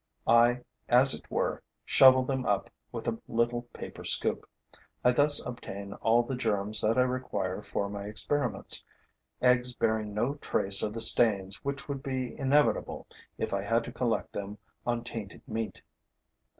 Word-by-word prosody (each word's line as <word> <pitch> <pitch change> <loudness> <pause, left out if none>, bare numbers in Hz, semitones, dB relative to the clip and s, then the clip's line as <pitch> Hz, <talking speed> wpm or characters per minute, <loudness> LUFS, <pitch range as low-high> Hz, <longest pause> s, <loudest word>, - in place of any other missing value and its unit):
I 120 +2 +4 0.3
as 130 +3 +6
it - - -10
were - - -2 0.2
shovel 130 -1 +6
them 130 0 -2
up 100 -4 -1 0.2
with - - -6
a 115 - -2
little 120 +1 -1
paper - - -9
scoop. - - -1 0.5
I 125 - +5
thus 145 +3 +5
obtain 100 -5 -7
all 115 +3 +2
the 130 - -5
germs 105 -3 0
that 115 +3 +1
I 125 - +5
require 125 -7 -3
for 100 -1 -3
my 100 0 -6
experiments, 110 +1 -1 0.6
eggs 125 0 +3
bearing 110 -2 -1
no 120 +6 0
trace 100 -8 +1
of 105 - -2
the 115 - -2
stains 100 -4 +5
which 140 0 -4
would 140 -2 -5
be 130 -3 -4
inevitable 140 +2 +1 0.3
if - - -3
I 100 - 0
had 115 +3 0
to - - -8
collect 120 -3 -2
them 100 +1 -6 0.3
on 120 -1 -1
tainted 115 -4 -8
meat. 110 -2 -5
115 Hz, 160 wpm, -29 LUFS, 105-125 Hz, 0.6 s, as